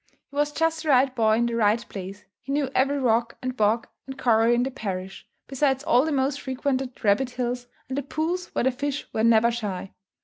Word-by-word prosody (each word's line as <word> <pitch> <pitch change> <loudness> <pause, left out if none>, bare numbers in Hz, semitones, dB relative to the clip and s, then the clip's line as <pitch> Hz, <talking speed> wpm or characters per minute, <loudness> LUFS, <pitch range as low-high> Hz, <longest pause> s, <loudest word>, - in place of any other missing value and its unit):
He - - -14
was 295 0 +1
just 325 +1 0
the 315 - -4
right 265 -1 +4
boy 220 -2 +3
in 235 +2 +2
the 235 - -2
right 225 +1 +2
place; 195 +1 -8 0.2
he 270 - -7
knew 280 -2 0
every 275 +2 +2
rock, 235 -3 +1
and 255 0 -4
bog, 220 +1 +2 0.2
and 265 0 -7
corrie 230 -1 +3
in 240 - +2
the 265 - -2
parish, 195 -6 -6 0.2
besides 270 0 0
all 255 -1 +4
the 315 - -1
most 275 0 0
frequented 260 -1 -3
rabbit 210 +6 +3
hills, 245 0 -3 0.2
and 260 - -4
the 285 - 0
pools 325 +6 -2
where - - +1
the 260 - +3
fish 280 +3 -3
were 220 - 0
never 230 0 +5
shy. 200 -5 -4
255 Hz, 215 wpm, -25 LUFS, 230-275 Hz, 0.2 s, never